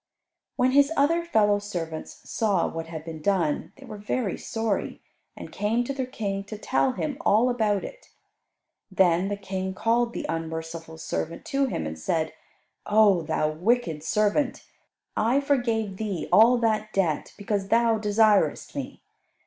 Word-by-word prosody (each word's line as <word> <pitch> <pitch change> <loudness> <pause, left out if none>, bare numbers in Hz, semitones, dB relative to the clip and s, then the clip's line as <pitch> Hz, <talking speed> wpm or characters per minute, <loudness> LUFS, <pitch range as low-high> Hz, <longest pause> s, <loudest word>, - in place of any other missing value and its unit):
When 255 +1 +2
his 280 +2 +4
other 330 +5 +3
fellow 210 -11 +3
servants 165 -6 -6
saw 215 -4 +1
what 165 0 -5
had 160 -1 -7
been 160 -2 -7
done 170 -4 0
they 275 - -13
were 215 -4 -9
very 210 -1 -2
sorry, 225 -3 -3 0.4
and - - -9
came 225 +4 0
to 275 - -3
their 260 -2 -3
King 200 -5 -3
to 215 +1 -7
tell 260 +4 +1
him 280 +2 -3
all 230 +5 +3
about 215 -5 +1
it. - - -10 0.8
Then 185 -1 +3
the 205 0 -2
King 190 -1 -4
called 235 +3 +1
the - - -4
unmerciful 160 0 -5
servant 165 +1 -4
to 275 0 +2
him, 80 - -3
and 80 0 -5
said, 160 - -1 0.5
"O 210 -4 +5
thou 155 -1 0
wicked 175 -1 0
servant; 215 - 0 0.5
I 235 +5 +2
forgave 230 -8 0
thee 200 -5 -3
all 235 +3 +7
that 215 -2 0
debt, 175 -6 -1
because 205 -1 -2
thou 230 0 +3
desiredst 210 0 +2
me. - - -6
210 Hz, 155 wpm, -26 LUFS, 175-235 Hz, 0.8 s, all